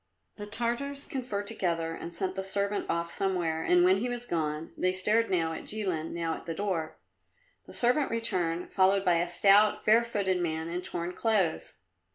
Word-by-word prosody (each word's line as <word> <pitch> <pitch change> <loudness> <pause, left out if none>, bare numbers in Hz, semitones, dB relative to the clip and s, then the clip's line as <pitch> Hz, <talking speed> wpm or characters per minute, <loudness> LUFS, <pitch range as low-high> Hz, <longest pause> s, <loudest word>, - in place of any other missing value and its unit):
The 205 -1 -7
Tartars 240 +6 -3
conferred 240 -6 -4
together, 170 -6 -2
and 170 - -7
sent 185 +2 -2
the 190 - -3
servant 200 +1 -1
off 170 0 -1
somewhere, 175 -5 -1
and 175 +1 +4
when 185 +2 +5
he 245 +4 -1
was 245 0 -4
gone 155 -5 -2
they 185 - +1
stared 210 +5 +2
now 165 -3 +1
at - - -7
Jilin, 185 -7 -2
now 165 -1 -2
at - - -9
the 165 - -3
door. 175 -5 -2 0.7
The - - -11
servant 250 +4 +2
returned, 180 -7 -1
followed 195 +1 +3
by 175 -1 +4
a 175 +1 0
stout, 200 +4 +4
bare 225 +2 +6
footed 195 -6 0
man, 160 -1 -2
in 175 +1 -3
torn 175 0 -3
clothes. 195 -5 0
185 Hz, 185 wpm, -29 LUFS, 170-215 Hz, 0.7 s, bare